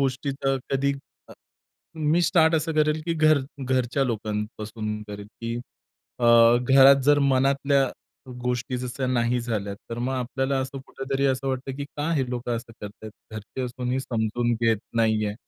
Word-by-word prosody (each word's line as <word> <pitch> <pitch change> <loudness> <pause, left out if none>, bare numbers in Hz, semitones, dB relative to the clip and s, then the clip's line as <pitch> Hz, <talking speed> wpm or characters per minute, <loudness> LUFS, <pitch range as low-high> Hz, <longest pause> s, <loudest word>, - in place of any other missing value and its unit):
गोष्टीचा 135 0 -1
कधी 140 +1 +1 0.4
अ, - - -11 0.7
मी 155 +3 +2
स्टार्ट 165 -2 +4
असं 160 +1 0
करेल 155 0 +2
की 165 - 0
घर 155 -2 +4 0.3
घरच्या 130 +1 +1
लोकांपासून 105 -1 -4
करेल 100 0 -7
की 115 0 -3 0.6
अ, 120 - -1 0.4
घरात 135 0 +7
जर 145 +1 +5
मनातल्या 140 0 +2 0.5
गोष्टी 125 +1 -2
जशा 130 +1 -3
नाही 125 -1 +1
झाल्या, 110 -4 -3 0.2
तर 115 - -4
मग 125 +2 -1
आपल्याला 135 +2 -1
असं 135 +1 -5
कुठेतरी 135 +1 -3
असं 135 0 0
वाटतं 130 0 -3
की 140 - -4
"का 150 +3 -1
हे 135 -4 +1
लोकं 120 -1 -2
असं 115 0 -9
करतायत. 105 +1 -9 0.2
घरचे 110 +4 -6
असूनही 125 +1 -2
समजून 120 -1 -1
घेत 115 -1 +3 0.2
नाहीये." 110 -2 +1
130 Hz, 150 wpm, -25 LUFS, 115-140 Hz, 0.7 s, घरात